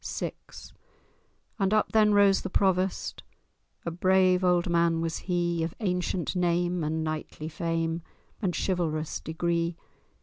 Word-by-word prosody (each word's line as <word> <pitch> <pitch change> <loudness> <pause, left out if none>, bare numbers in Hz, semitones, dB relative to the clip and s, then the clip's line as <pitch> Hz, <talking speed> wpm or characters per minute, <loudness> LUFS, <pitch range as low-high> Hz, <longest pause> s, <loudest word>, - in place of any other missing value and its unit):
VI - - -3 1.3
And 195 +1 +2
up 215 - +1
then 215 -1 +5
rose 200 -1 +5
the 190 - -4
Provost— 190 -1 0 0.6
A 170 - -2
brave 185 +1 +3
old 180 0 +3
man 170 -1 +2
was 165 0 -2
he, 175 -1 +1
Of 160 0 -3
ancient 180 -3 -1
name, 175 -1 +1
and 160 +1 -1
knightly 155 0 -4
fame, 165 0 -2 0.4
And 180 -5 0
chivalrous 160 -4 -1
degree. 170 +1 -1
175 Hz, 130 wpm, -28 LUFS, 165-185 Hz, 1.3 s, then